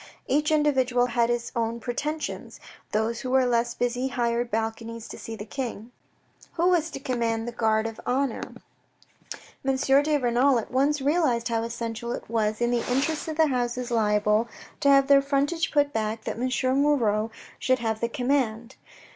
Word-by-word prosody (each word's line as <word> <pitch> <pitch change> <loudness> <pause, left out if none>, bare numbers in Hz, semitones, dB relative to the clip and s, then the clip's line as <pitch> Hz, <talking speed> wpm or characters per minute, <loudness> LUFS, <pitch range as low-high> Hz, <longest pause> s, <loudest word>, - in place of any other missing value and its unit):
Each 295 +3 +2
individual 260 -5 +2
had 235 -1 +1
his 240 0 -1
own 230 0 -1
pretensions; 295 +6 -4 0.3
those 220 +2 0
who 255 - -4
were 260 0 +4
less 240 -1 +1
busy 245 +1 -1
hired 240 -1 -1
balconies 225 +1 -3
to - - -8
see 225 - -7
the 210 - -7
King. 235 -2 -5 0.6
Who 345 +1 +2
was 340 -3 +2
to 275 - -7
command 230 -3 -1
the - - -3
Guard 220 -2 +1
of 225 -1 -5
Honour? 260 -1 0 1.2
M. 270 0 +1
de 280 +3 +3
Renal 250 +1 +3
at 225 - -4
once 280 +3 +2
realised 275 -6 +1
how 230 -1 0
essential 235 0 -4
it - - -7
was 215 -1 -1
in 240 0 +2
the 240 -1 +1
interests 295 +5 0
of 315 -1 -4
the 320 -2 +4
houses 245 -1 -2
liable 210 0 +2 0.3
to 280 - +3
have 275 -1 +6
their 275 0 +6
frontage 285 +4 0
put 290 -1 +2
back 220 0 -2
that - - -4
M. 255 +1 0 0.3
Moirod 225 -7 +2 0.3
should 255 0 +2
have 225 -2 -2
the 235 - -1
command. 245 -3 -1
245 Hz, 170 wpm, -26 LUFS, 230-275 Hz, 1.2 s, have